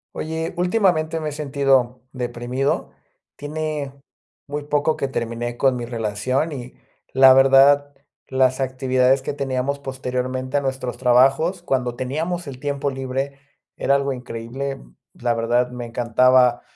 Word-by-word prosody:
Oye, 160 +1 -3
últimamente 175 -4 +1
me 155 -1 -3
he - - -7
sentido 135 -4 +1
deprimido. 125 +2 -2 0.4
Tiene 150 -2 -4 0.5
muy 145 +1 -4
poco 150 +1 +1
que 140 - -1
terminé 120 -1 -3
con 135 0 +3
mi 120 -1 -4
relación 115 +6 -1
y 125 -2 -8 0.4
la 130 0 +8
verdad, 135 +2 +5 0.3
las 130 0 +2
actividades 130 0 +2
que 135 - -4
teníamos 140 0 -2
posteriormente 130 0 -3
a - - +1
nuestros 130 -3 -3
trabajos 135 +8 +3
cuando 125 -7 -1
teníamos 160 +7 -3
el 130 -2 -8
tiempo 140 0 -2
libre 135 +1 -4 0.4
era 140 - +2
algo 140 0 0
increíble. 125 +2 -6 0.3
La 120 -1 -1
verdad, 120 +2 +1
me 125 -1 -6
encantaba 125 +1 +3
135 Hz, 130 wpm, -22 LUFS, 125-145 Hz, 0.5 s, la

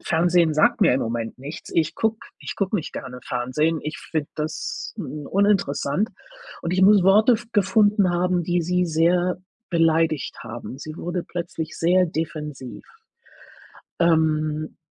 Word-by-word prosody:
Fernsehen 170 -1 +3
sagt 235 +9 +3
mir 180 -10 +5
im 130 - +1
Moment 115 +1 -3
nichts. 145 +4 -8
Ich 160 -2 +1
gucke 220 0 0 0.2
ich - - -6
gucke 200 +1 0
nicht 160 - -5
gerne 125 0 -7
Fernsehen, 150 +6 -1
ich 150 +2 -5
finde 155 -3 -3
das, 155 +2 -4
hm, 150 -6 -6
uninteressant 200 - +1 0.5
und 170 - -2
ich 185 +1 +2
muss 200 0 +6
Worte 210 +6 +5
f 235 +1 -1
gefunden 205 -1 +3
haben, 175 0 +1
die 175 0 0
sie 180 +1 +1
sehr 175 +3 +2 0.3
beleidigt 165 -3 +1
haben. 120 +3 -8
Sie 155 +2 -8
wurde 175 +1 -3
plötzlich 165 -2 -5
sehr 180 +2 +3
defensiv. 150 -5 -5 1.2
Ähm, 155 -2 +1
165 Hz, 145 wpm, -23 LUFS, 155-185 Hz, 1.2 s, muss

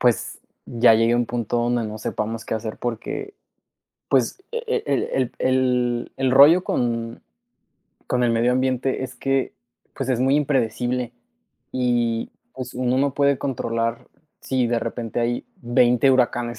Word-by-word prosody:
pues, 120 -2 +1 0.3
ya 120 -1 +4
llegue 115 +1 +3
un 120 0 +1
punto 120 0 -2
donde 120 0 0
no 110 0 -6
sepamos 110 +1 -4
qué - - -3
hacer, 110 0 -4
porque, 125 - -5 0.8
pues, 380 - +1
e 470 - -2
e 465 -1 0
el - - +1
el 130 -2 0
el 125 -2 +1
el 130 -1 +1
rollo 150 +7 +7
con 115 -4 -2 0.9
con 125 -1 0
el 120 - +3
medio 115 +2 +2
ambiente 130 +1 0
es 130 -1 -6
que, 135 +1 -1 0.4
pues, 135 -2 -4
es 125 - +1
muy 135 +2 +3
impredecible, 125 -3 0 0.6
y, 120 -2 0 0.2
pues, 130 -1 -7
uno 125 +1 0
no 140 0 +1
puede 140 -1 +2
controlar 115 -4 -2 0.3
si 130 -2 0
de 120 0 +1
repente, 115 0 -4
hay 120 +1 -1 0.2
20 120 +2 +3
huracanes, 120 -2 +1
120 Hz, 150 wpm, -22 LUFS, 115-130 Hz, 0.9 s, rollo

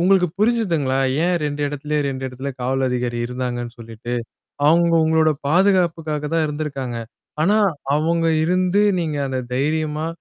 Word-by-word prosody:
உங்களுக்கு 180 0 +4
புரிஞ்சுதுங்களா? 175 - +1 0.3
ஏன் 180 0 +2
2 145 0 -3
இடத்துலயே 150 +1 -2
2 135 -1 -4
இடத்துல 130 +2 -6
காவல் 130 +1 0
அதிகாரி 120 -1 -2
இருந்தாங்கன்னு 125 -1 -4
சொல்லிட்டு, 115 +1 -8 0.5
அவுங்க 170 +2 +4
உங்களோட 160 0 +3 0.2
பாதுகாப்புக்காக 165 -4 +2
தான் 165 - +2
இருந்திருக்காங்க. 140 -5 -4 0.4
ஆனா 205 +6 +3 0.4
அவுங்க 165 +2 +1 0.2
இருந்து 185 +3 +2 0.2
நீங்க 155 -3 -2
அந்த 130 -1 -2 0.2
தைரியமா 155 +3 -1
150 Hz, 130 wpm, -21 LUFS, 130-170 Hz, 0.5 s, உங்களுக்கு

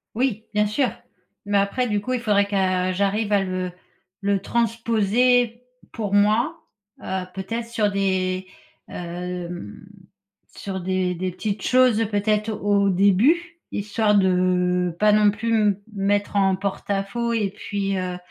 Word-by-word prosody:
Oui! 230 -3 -1
Bien 210 0 +3
sûr, 245 +5 +1 0.6
mais 205 0 +1
après 200 +6 +1
du 210 -1 +1
coup 255 +5 -3
il 250 - -1
faudrait 200 -2 +3
que, 185 -2 0
j'arrive 205 +2 0
à 195 -1 +3
le 185 -1 -3 0.5
le 200 -1 +1
transposer 235 +2 +1 0.3
pour 210 -4 -4
moi, 215 +11 +3 0.5
heu, 190 -1 -3
peut-être 230 +5 -4
sur 215 -3 0
des, 190 -1 -1 0.4
hem, 175 - -6 0.7
sur 190 -1 -5
des 185 0 -1
des 185 +1 -3
petites 200 +2 -4
choses 255 -3 +4
peut-être 210 +1 0
au 205 -1 +2
début, 255 - +2
histoire 210 +1 +1
de, 180 -2 +2
pas 210 0 +5
non 210 -1 +5
plus 225 +3 -3
me 205 -2 +2
mettre 205 +1 0
en 195 -1 +3
porte-à-faux 200 +4 -2
et 210 -4 0
puis, 200 -1 -3
heu 180 -1 -3
200 Hz, 140 wpm, -23 LUFS, 190-220 Hz, 0.7 s, pas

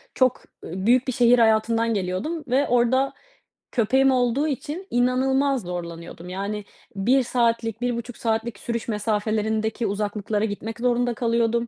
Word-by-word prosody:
Çok 255 -2 +3 0.3
ı 190 +3 -5
büyük 250 +3 +4
bir 260 - 0
şehir 240 0 +5
hayatından 225 +1 +3
geliyordum 200 - -2
ve 265 +4 +2
orada 245 +3 +2 0.6
köpeğim 265 +3 +3
olduğu 255 +3 +1
için 305 +6 -4
inanılmaz 265 +2 +2
zorlanıyordum, 170 -1 -7
yani, 200 +3 -4 0.3
1 250 +7 +3
saatlik 230 -2 0
1,5 245 -1 -3
saatlik 225 -2 -2
sürüş 235 -1 -4
mesafelerindeki 220 +1 -1
uzaklıklara 210 +1 -1
gitmek 220 +2 -5
zorunda 245 0 +1
kalıyordum 235 -1 +1
230 Hz, 130 wpm, -24 LUFS, 210-250 Hz, 0.6 s, şehir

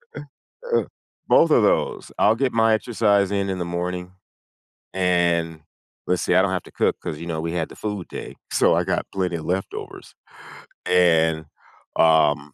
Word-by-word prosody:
Uh - - -6 0.6
uh, - - +3 0.5
both 165 - +5
of 120 - +5
those 105 - 0
I'll 110 - +4
get 130 +2 -1
my 115 -1 +3
exercise 105 -4 +1
in 100 -1 -1
in 95 -1 -3
the 90 - -2
morning, 90 +1 -4 0.8
and 85 -3 +1 0.5
Let's 90 0 0
see 90 - +1
I 95 - +6
don't 95 0 +1
have 95 - -2
to - - -16
cook - - 0
'cause, 75 - -5
you 85 - -7
know, 80 -2 -3
we 85 0 -3
had 85 -2 -2
the - - -13
food 105 -4 -5
day, - - -8
so - - +3
I - - +1
got - - -1
plenty 90 -3 -1
of 80 - -7
leftovers, 95 +2 -5 0.7
and, 80 -3 +3 0.5
um, 75 -3 +3
90 Hz, 175 wpm, -22 LUFS, 85-100 Hz, 0.8 s, I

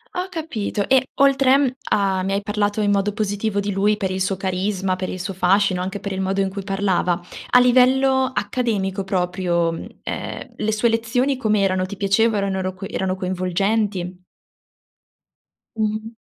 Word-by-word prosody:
Ho 365 +1 -2
capito, 305 - -3
e 265 0 +4 0.2
oltre, 275 -1 +5
mhmm, 275 -3 +2 0.2
a 195 -2 +2
mi 195 +1 -1
hai 200 - 0
parlato 205 +1 -1
in 205 -1 +2
modo 200 +1 +1
positivo 205 0 -1
di 200 0 -2
lui 205 +2 +2
per 190 -3 -2
il 185 - -2
suo 195 0 0
carisma, 190 0 -1
per 185 - -3
il 185 - -5
suo 195 0 -4
fascino, 185 0 +2
anche 190 +2 -4
per 200 - -4
il 190 - -3
modo 195 +1 0
in 195 - 0
cui 195 0 -6
parlava, 195 -3 0 0.3
a 250 - +6
livello 260 +2 +4
accademico 205 -4 -1
proprio, 180 -2 0
mhmm, 165 - -6 0.2
ehm, - - -6
le 220 - 0
sue 230 +2 +2
lezioni 245 +4 0
com'erano? 195 -5 +1
Ti 205 - -7
piaceva, 205 +3 +2
erano 195 -1 -1
ro 185 0 -3
co 185 +1 -8
erano 190 -1 -1
coinvolgenti? 185 0 -1 1.6
Mh-mh. 215 +1 -2
200 Hz, 175 wpm, -21 LUFS, 190-220 Hz, 1.6 s, a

